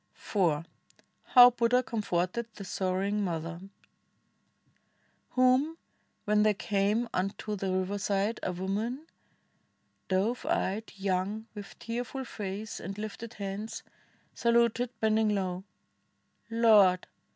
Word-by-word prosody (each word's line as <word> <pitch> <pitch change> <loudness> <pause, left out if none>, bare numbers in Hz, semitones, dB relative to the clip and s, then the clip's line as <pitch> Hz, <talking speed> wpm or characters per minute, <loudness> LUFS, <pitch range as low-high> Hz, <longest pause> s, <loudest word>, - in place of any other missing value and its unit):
38 - - -30
STORIES 190 -5 +2
OF 150 - -6
BUDDHA - - -26
IV - - -34
HOW 245 -1 +11
BUDDHA 245 +1 +2
COMFORTED 210 -1 -1
THE 200 - -8
SORROWING 195 +2 -1
MOTHER 170 -1 -3 1.7
Whom, 255 +5 +3 0.5
when 210 0 +3
they 210 -1 +3
came 205 +4 0
unto 195 +3 -2
the 195 -1 -2
riverside, 200 +3 0
A - - -1
woman 210 - -3 0.5
— - - -44
dove 200 +6 0
eyed, 215 +4 -1
young, 195 +2 -1
with 205 -2 -9
tearful 245 +3 -4
face 205 -1 -5
And 195 +3 -6
Hfted 215 +2 -6
hands 200 +1 -5 0.2
— - - -36
saluted, 235 +1 +2
bending 220 -1 +3
low: 185 -1 -3 0.8
"Lord! 215 -6 +5
210 Hz, 120 wpm, -30 LUFS, 190-230 Hz, 1.7 s, HOW